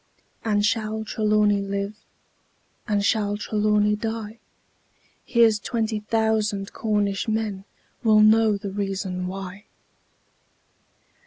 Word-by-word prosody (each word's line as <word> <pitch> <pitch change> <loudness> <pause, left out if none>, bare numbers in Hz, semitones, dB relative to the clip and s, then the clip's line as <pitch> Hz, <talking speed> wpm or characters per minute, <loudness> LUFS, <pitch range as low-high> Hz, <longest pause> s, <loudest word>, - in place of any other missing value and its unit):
And 210 -2 +1
shall 220 0 -1
Trelawny 210 -1 +2
live? 200 +1 -3 0.9
Or 205 -1 +2
shall 205 0 +1
Trelawny 210 0 +1
die? 220 0 -5 0.8
Here's 230 -3 +3
twenty 220 -1 -2
thousand 210 -2 0
Cornish 205 -2 -1
men 215 -3 -2 0.4
Will 215 -2 +5
know 215 -1 +5
the 200 -1 -6
reason 190 -2 -3
why! 195 +2 -7
210 Hz, 95 wpm, -24 LUFS, 200-220 Hz, 0.9 s, Will